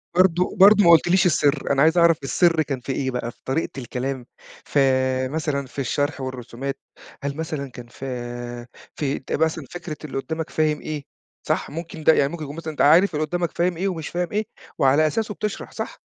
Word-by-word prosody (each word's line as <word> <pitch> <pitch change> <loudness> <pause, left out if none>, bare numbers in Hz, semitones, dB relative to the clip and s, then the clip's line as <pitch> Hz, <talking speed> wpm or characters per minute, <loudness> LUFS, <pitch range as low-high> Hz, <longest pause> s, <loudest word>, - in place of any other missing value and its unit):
برضه 180 0 +3
برضه 205 +2 +8
ما 170 - +7
قُلتليش 175 +3 +5
السِّر، 145 -5 +2
أنا 140 0 +3
عايز 160 +3 +4
أعرَف 170 -1 +5
السِّر 165 +5 +3
كان 135 -3 -3
في 125 - -5
إيه 130 0 -1
بقى، 120 -1 -3
في - - -30
طريقة 135 +5 0
الكلام 130 0 -4 0.4
ف - - -3 0.5
مثلًا 145 -1 -2
في 135 - -9
الشرح 145 +2 -1
والرسومات، 130 +1 -5 0.4
هل 140 +1 -3
مثلًا 155 -5 -4
كان 120 -1 -10
في 135 +2 -8 0.9
في 140 -2 -1
أنت - - -11
مثلًا 160 -1 0
فكرة 175 -3 -6
اللي 140 - -5
قُدّامك 160 +3 -4
فاهم 155 -1 0
إيه، 150 -2 -5 0.4
صح؟ - - 0
ممكن 165 0 -7
ده، 160 - +7
يعني 140 -2 +2
ممكن 165 -3 -6
يكون 145 0 -7
مثلًا 165 -1 -5
أنت 150 - -3
عارِف 170 +4 +5
اللي 155 +1 0
قُدّامك 175 0 -2
فاهم 175 0 +1
إيه 195 +3 0
ومش 165 -5 -3
فاهم 175 0 -2
إيه 215 +1 0 0.3
وعلى 140 +4 +4
أساسُه 215 +6 -2
بتشرَح 210 0 -4
صح؟ - - -6
155 Hz, 195 wpm, -23 LUFS, 135-170 Hz, 0.9 s, برضه